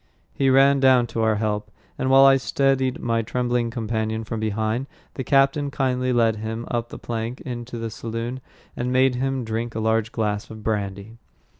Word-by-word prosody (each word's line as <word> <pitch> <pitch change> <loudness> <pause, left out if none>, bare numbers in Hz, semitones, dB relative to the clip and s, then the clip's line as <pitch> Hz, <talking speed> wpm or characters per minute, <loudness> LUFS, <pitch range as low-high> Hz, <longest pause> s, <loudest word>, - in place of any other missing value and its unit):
He 135 -1 +2
ran 135 +1 +5
down 130 -2 +5
to 115 - -1
our 110 -1 +3
help, 105 -1 -2 0.3
and 130 - -1
while 135 +1 +7
I 135 0 +7
steadied 135 -1 +1
my 115 -1 0
trembling 120 +1 -1
companion 110 -1 -2
from 110 0 -4
behind, 110 +4 -1 0.3
the 130 - -4
captain 140 +2 +2
kindly 130 -2 0
led 115 -3 +2
him 110 +2 -4
up 120 -1 -2
the - - -8
plank 115 +1 -4
into 120 -1 -6
the 115 -1 -4
saloon, 115 +3 -5 0.3
and 125 +1 -2
made 130 0 +4
him 135 +1 -1
drink 115 +1 -3
a - - -1
large 110 0 +1
glass 105 -3 -2
of 110 -1 -10
brandy. 100 +1 -3
120 Hz, 180 wpm, -23 LUFS, 110-130 Hz, 0.3 s, while